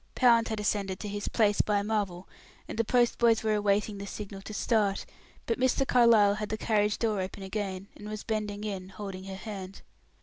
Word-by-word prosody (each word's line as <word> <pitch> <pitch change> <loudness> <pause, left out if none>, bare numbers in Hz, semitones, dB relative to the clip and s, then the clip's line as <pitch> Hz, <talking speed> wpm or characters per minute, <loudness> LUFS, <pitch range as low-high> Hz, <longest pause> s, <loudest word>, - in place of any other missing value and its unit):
Pound 235 -3 +5
had 220 -1 -3
ascended 200 -2 -1
to 210 - -4
his 205 0 -4
place 210 -3 +3
by 205 -1 +1
Marvel, 200 -4 -2 0.4
and - - -6
the - - +4
postboys 235 -1 +3
were 220 -1 +2
awaiting 205 0 +1
the 200 - -6
signal 195 -1 -7
to 205 - -9
start, 210 -2 +1 0.4
but 230 - -1
Mr. 260 +1 +2
Carlyle 230 -5 +6
had 210 0 -4
the 220 - -2
carriage 210 -1 +1
door 215 -4 0
open 190 +1 -6
again, 195 -1 -4
and 210 - -9
was 215 0 -5
bending 210 -2 -3
in 195 -3 -4
holding 195 -2 -7
her 195 0 -6
hand. 195 -2 -8
210 Hz, 195 wpm, -29 LUFS, 200-220 Hz, 0.4 s, Carlyle